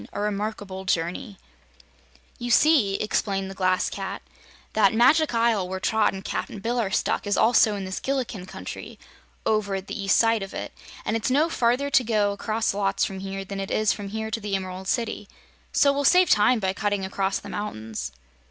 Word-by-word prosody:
A - - -4
Remarkable 205 -2 -3
Journey 185 +3 -2 1.0
"You 240 0 -4
see," 240 -6 +4
explained 195 -2 -1
the - - -7
Glass 185 -1 +1
Cat, - - -5 0.5
"that 215 -1 +4
Magic 275 +4 +4
Isle 225 -5 +2
where 190 0 -3
Trot 220 +2 +2
and 195 0 -8
Cap'n - - -3
Bill 235 +5 -1
are 215 -4 0
stuck 200 - 0
is 205 - +1
also 220 -2 +4
in 195 -1 -4
this 190 +1 -4
Gillikin 245 -8 -3
Country - - -8 0.5
over 210 -2 +1
at 190 0 -4
the 205 - -5
east 195 - +3
side 225 -1 +3
of 195 -1 -7
it, - - -5 0.3
and 215 - 0
it's 225 +3 0
no 295 +6 +3
farther 250 +1 +1
to 260 - +5
go 215 -3 +1
across 215 +2 -1
lots 195 -1 +1
from 190 -1 -5
here 195 0 -5
than 195 0 -6
it 195 0 -4
is 215 -1 +2
from 205 -1 -7
here 220 +1 -4
to 225 - -1
the 205 -2 -2
Emerald 185 0 -5
City. 220 -2 -2 0.4
So 280 -1 +4
we'll 285 0 -1
save 360 +5 +5
time 215 +4 +4
by 190 -2 0
cutting 205 -1 -1
across 195 0 -1
the - - -9
mountains." 110 - -5
205 Hz, 195 wpm, -25 LUFS, 195-230 Hz, 1.0 s, to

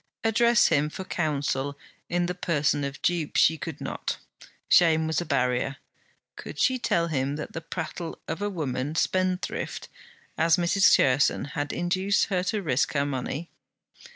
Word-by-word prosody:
Address 235 +1 +4
him 150 +1 +2
for 190 - -6
counsel 145 -5 -2 0.3
in 175 0 +1
the 180 - -2
person 150 -5 0
of 140 0 -4
dupe, 170 -4 0
she 160 - +5
could 160 -2 -6
not; - - -4 0.5
shame 160 -2 +5
was 160 -1 0
a 175 - -6
barrier. 130 -1 0 0.6
Could - - -9
she 260 -1 +2
tell 170 -7 +1
him 140 -2 -1
that 150 - -6
the 165 - -5
prattle 165 0 -5
of 175 - -4
a 205 - 0
woman, 150 -5 -3
spendthrift 185 +2 -1 0.5
as 165 0 +4
Mrs. 180 +3 +4
Cherson, 135 +2 +2
had 145 -1 -2
induced 185 +3 +1
her 180 - +2
to 205 +1 -1
risk 130 -5 +1
her 140 -1 +1
money? 145 +4 -4
160 Hz, 155 wpm, -26 LUFS, 140-180 Hz, 0.6 s, she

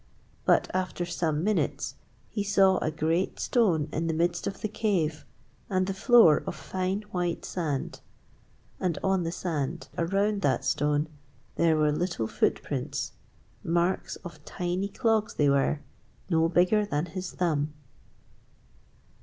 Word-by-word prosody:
But - - +4
after 185 -1 -1
some 160 -3 -1
minutes 210 +1 0 0.3
he 205 - -3
saw 195 -2 +4
a - - 0
great 160 +4 0
stone 180 - +2
in 165 +1 -1
the 165 - 0
midst 170 +1 0
of - - -5
the - - 0
cave 175 - -1 0.4
and 185 -1 +1
the 195 - -2
floor 215 -5 +6
of - - -3
fine 190 +2 -2
white 175 -2 -2
sand. 150 -7 -3 0.8
And 175 -4 0
on 190 -1 +2
the 165 - -1
sand 165 -2 -3
around 200 +4 +1
that 140 -6 +1
stone 145 +1 +1 0.5
there 165 -2 +3
were 150 -1 +3
little 170 -6 -1
footprints - - -1 0.5
marks 170 +2 0
of 155 -4 -9
tiny 180 +4 -2
clogs 220 0 0
they 145 -1 +3
were, 140 +2 +1 0.5
no 165 0 +3
bigger 180 +5 +3
than 155 -6 -1
his 185 +2 -6
thumb! 155 -4 0
175 Hz, 135 wpm, -28 LUFS, 155-190 Hz, 0.8 s, floor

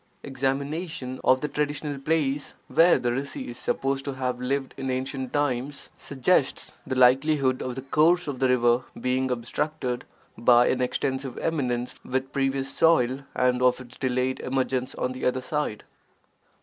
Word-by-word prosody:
Examination 135 +1 -3
of 130 0 +4
the 150 - -1
traditional 145 -1 -2
place 145 -1 -1
where 170 +1 +5
the 120 - -1
rsi 135 +2 -3
is 120 - -8
supposed 135 0 -1
to 140 - -3
have 125 -1 -2
lived 135 +1 -2
in 135 -1 -4
ancient 130 0 -3
times, 140 -1 -2
suggests 140 +1 +1 0.2
the 130 - -2
likelihood 130 +1 +4
of 125 -1 -4
the 130 - -6
course 165 +6 +3
of 140 -3 -4
the 130 - +2
river 120 -1 +3 0.2
being 130 +1 0
obstructed 125 +1 -2 0.3
by 120 +1 +5
an 130 - 0
extensive 130 +1 -2
eminence 125 -6 -2
with 130 +1 -2
pervious 135 0 0
soil 130 -6 +3 0.2
and 125 0 +2
of 125 0 +3
its 125 -1 -12
delayed 130 0 -1
emergence 130 -1 -1
on 125 - -2
the 130 0 -7
other 125 +1 +1
side. 130 -4 -3
130 Hz, 155 wpm, -26 LUFS, 125-140 Hz, 0.3 s, where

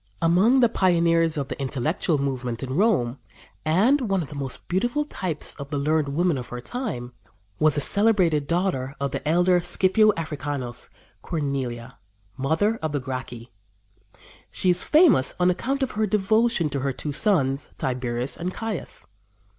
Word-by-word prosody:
Among 195 +11 +4
the 240 - +6
pioneers 170 -5 +2
of 140 -2 -3
the - - -5
intellectual 150 +5 -1
movement 125 -4 -3
in 130 0 -4
Rome, 150 - +1 0.4
and 210 - +3
one 195 -3 +1
of 145 - -10
the 150 - -9
most 135 -2 -5
beautiful 240 +11 0
types 180 - -3
of 140 0 -7
the 145 - -2
learned 150 +1 +1
women 160 +1 0
of 120 - -8
her 125 - -6
time, 125 - -5 0.5
was 155 -2 +3
the 145 - 0
celebrated 185 -8 +3
daughter 165 -6 -1
of 140 -1 -2
the - - -3
elder 180 +2 +4
Scipio 190 +4 +3
Africanus 145 -6 -4 0.3
Cornelia, 130 -6 -4 0.4
mother 160 +12 0
of 155 -2 -3
the 145 - 0
Gracchi. 125 -2 -7 1.0
She 185 - +2
is 180 - +1
famous 305 - +4
on 180 0 +4
account 265 +9 -2
of 260 - -2
her 215 0 0
devotion 210 -2 +2
to 140 - -2
her 135 0 -1
two 145 +3 -5
sons, 140 -7 +1
Tiberius 125 0 -1
and 180 +2 -3
Caius. 220 -2 -5
160 Hz, 160 wpm, -24 LUFS, 135-190 Hz, 1.0 s, the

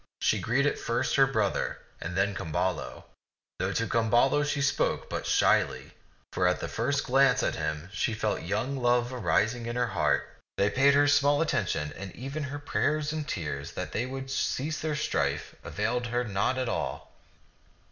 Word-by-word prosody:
She - - +2
greeted 140 +5 +1
first 115 - 0
her 135 -1 +6
brother, 110 -7 0 0.2
and 85 +2 -4
then 100 +1 +2
Camballo; 90 +1 -2 0.6
though - - 0
to 115 - 0
Camballo 120 +6 +3
she 145 0 -1
spoke 140 0 0
but - - -3
shyly, - - +2 0.4
for 90 - +2
at 90 - +1
the - - -3
first 135 +5 0
glance 130 -1 +4
at - - +1
him 75 +1 -3
she 110 +2 0
felt 110 -1 -1
young 110 +10 -2
love 120 0 +2
arising 115 -1 +1
in 120 - -3
her 125 0 +2
heart. 90 - +1 0.3
They 100 +1 +2
paid 140 +3 +4
her 145 0 +5
small 145 0 +4
atten 140 - +1
tion, 75 -3 -2
and 95 -2 -8
even 135 +4 -4
her 140 +1 -5
prayers 150 +1 0
and 155 -1 -3
tears 75 - -4
that - - -5
they 125 - -1
would 135 0 -6
cease 150 +3 -1
their 155 -1 -2
strife 155 - -1
availed 120 +4 -1
her 120 +1 0
not 110 +4 0
at 130 -1 -1
all. - - -3
125 Hz, 175 wpm, -28 LUFS, 105-140 Hz, 0.6 s, her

